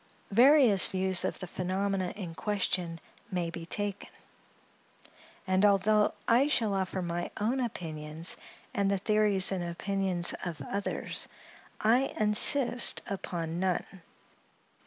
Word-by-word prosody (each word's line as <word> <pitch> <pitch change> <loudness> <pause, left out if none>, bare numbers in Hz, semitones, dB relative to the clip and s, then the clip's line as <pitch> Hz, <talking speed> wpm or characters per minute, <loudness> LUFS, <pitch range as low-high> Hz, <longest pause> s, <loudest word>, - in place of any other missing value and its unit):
Various 245 -3 +6
views 190 -1 +4
of - - -3
the 185 - -7
phenomena 185 +1 -3
in 185 -5 -7
question 180 -4 -3 0.3
may 175 -2 -3
be 165 0 -8
taken; 205 +1 -3 1.4
and 185 0 0
although 210 +1 +2
I 245 +5 +3
shall 225 -8 -1
offer 190 -1 -3
my 175 0 -4
own 235 +6 -1
opinions 160 -8 -2 0.4
and 200 -4 0
the 200 - 0
theories 205 -1 +1
and 185 -2 -3
opinions 180 0 -2
of 170 -4 -6
others, 200 0 -3 0.5
I 245 +5 +1
insist 235 +4 +5
upon 170 -4 -5
none. 185 0 -3
195 Hz, 115 wpm, -28 LUFS, 180-210 Hz, 1.4 s, Various